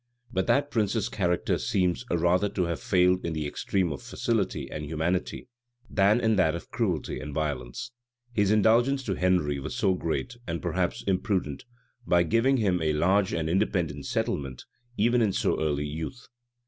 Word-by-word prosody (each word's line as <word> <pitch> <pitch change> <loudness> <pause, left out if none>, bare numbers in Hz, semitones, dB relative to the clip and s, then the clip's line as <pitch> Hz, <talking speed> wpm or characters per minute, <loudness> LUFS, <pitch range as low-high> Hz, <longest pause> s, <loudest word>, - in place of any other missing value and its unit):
But 95 0 0
that 145 +1 +2
prince's 110 -1 0
character 90 -5 0
seems 90 +4 0
rather 90 +4 +2
to 100 -2 -1
have 85 -1 -2
failed 90 0 +2
in 85 - -2
the 80 -1 -2
extreme 90 +4 -1
of 70 - -5
facility - - -1
and 75 - -5
humanity, 80 +4 -2 0.4
than 100 +3 +4
in 110 -3 +2
that 80 -4 +3
of 85 - -8
cruelty 110 -9 -1
and 75 -1 -7
violence. 75 - -3 0.4
His 105 -3 +2
indulgence 120 +6 +3
to 100 - -1
Henry 90 -6 +1
was - - -5 0.2
great, 120 +9 -3
and 85 0 -2
perhaps - - -1
imprudent, 95 -6 -1 0.4
by 85 0 +4
giving 115 +10 +2
him 95 -6 +1
a 80 -1 +1
large 95 +5 +2
and 80 -1 -1
independent 85 -6 0
settlement, 65 -3 -2 0.3
even 120 +3 +3
in 105 -4 +2
so - - 0
early 75 -2 0
youth. 80 - -6
90 Hz, 160 wpm, -27 LUFS, 80-105 Hz, 0.4 s, than